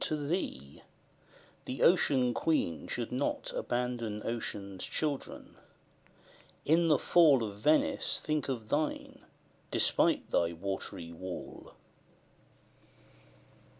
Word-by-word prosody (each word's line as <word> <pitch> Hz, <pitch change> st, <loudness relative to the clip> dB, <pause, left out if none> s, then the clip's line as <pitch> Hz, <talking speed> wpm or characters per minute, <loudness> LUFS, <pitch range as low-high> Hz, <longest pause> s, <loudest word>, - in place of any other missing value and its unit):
to 155 Hz, -, -1 dB
thee: 145 Hz, -, -4 dB, 0.8 s
the 130 Hz, -, -3 dB
Ocean 135 Hz, -8 st, +4 dB
Queen 120 Hz, -, 0 dB
should 120 Hz, -2 st, -3 dB
not 130 Hz, +3 st, -2 dB
Abandon 120 Hz, -3 st, -2 dB
Ocean's 100 Hz, -4 st, -4 dB
children; 145 Hz, -3 st, -4 dB, 1.1 s
in 165 Hz, +3 st, +4 dB
the 150 Hz, -3 st, +5 dB
fall 150 Hz, -8 st, +5 dB
Of 100 Hz, -2 st, -6 dB
Venice 155 Hz, +8 st, +2 dB
think 155 Hz, -2 st, -2 dB
of 115 Hz, -5 st, -4 dB
thine, 150 Hz, +4 st, -2 dB, 0.5 s
despite -, -, +2 dB
thy 85 Hz, 0 st, +2 dB
watery 85 Hz, -2 st, -5 dB
wall. 95 Hz, +2 st, -8 dB
125 Hz, 95 wpm, -31 LUFS, 100-150 Hz, 1.1 s, the